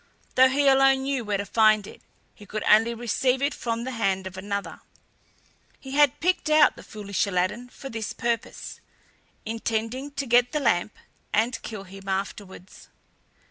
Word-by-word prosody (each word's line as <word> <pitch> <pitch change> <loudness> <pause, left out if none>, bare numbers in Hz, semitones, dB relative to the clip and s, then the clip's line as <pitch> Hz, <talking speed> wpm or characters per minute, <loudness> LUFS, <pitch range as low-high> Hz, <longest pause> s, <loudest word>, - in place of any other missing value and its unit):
Though 260 0 +6
he 280 +2 +2
alone 270 0 +5
knew 270 -2 -1
where 205 -2 -1
to 200 - -4
find 215 -1 +3
it, - - -12 0.3
he 205 - -15
could 215 +1 -4
only 225 +2 +4
receive 250 +2 0
it 280 +1 0
from 230 -1 -3
the 260 - -4
hand 195 -5 -1
of 190 0 -7
another. 200 +1 -5 1.0
He 265 - -10
had 290 -1 +3
picked 360 -1 0
out 305 -1 +5
the - - -12
foolish 205 -1 -3
Aladdin 195 +6 -1
for 270 - -10
this 225 -3 -4
purpose, 235 -1 -4 0.7
intending 225 +4 -3
to 275 0 -3
get 245 0 +3
the 300 - +1
lamp 215 -7 +1 0.4
and 225 +2 0
kill 215 -4 -7
him 195 0 -13
afterwards. 190 -1 -6
230 Hz, 165 wpm, -25 LUFS, 205-265 Hz, 1.0 s, Though